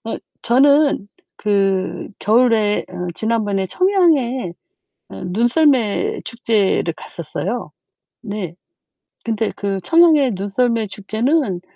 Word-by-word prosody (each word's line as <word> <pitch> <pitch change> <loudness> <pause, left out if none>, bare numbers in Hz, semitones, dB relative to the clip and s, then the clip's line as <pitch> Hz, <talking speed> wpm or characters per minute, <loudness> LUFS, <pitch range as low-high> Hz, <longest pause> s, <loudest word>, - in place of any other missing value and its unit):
어, 225 - -4 0.3
저는 280 -2 +3 0.3
그 195 -2 0
겨울에 220 -1 +2
어 180 -1 -6
지난번에 210 -4 -1
청양에 280 - +1 0.6
어 95 - -9
눈썰매 250 - +1
축제를 215 -7 0
갔었어요. 175 +4 -5 0.5
네. 200 -6 -5 0.7
근데 225 -1 -1
그 200 -1 -2
청양의 315 - +4
눈썰매 220 +3 0
축제는 215 - -1
225 Hz, 200 characters per minute, -19 LUFS, 195-260 Hz, 0.7 s, 청양의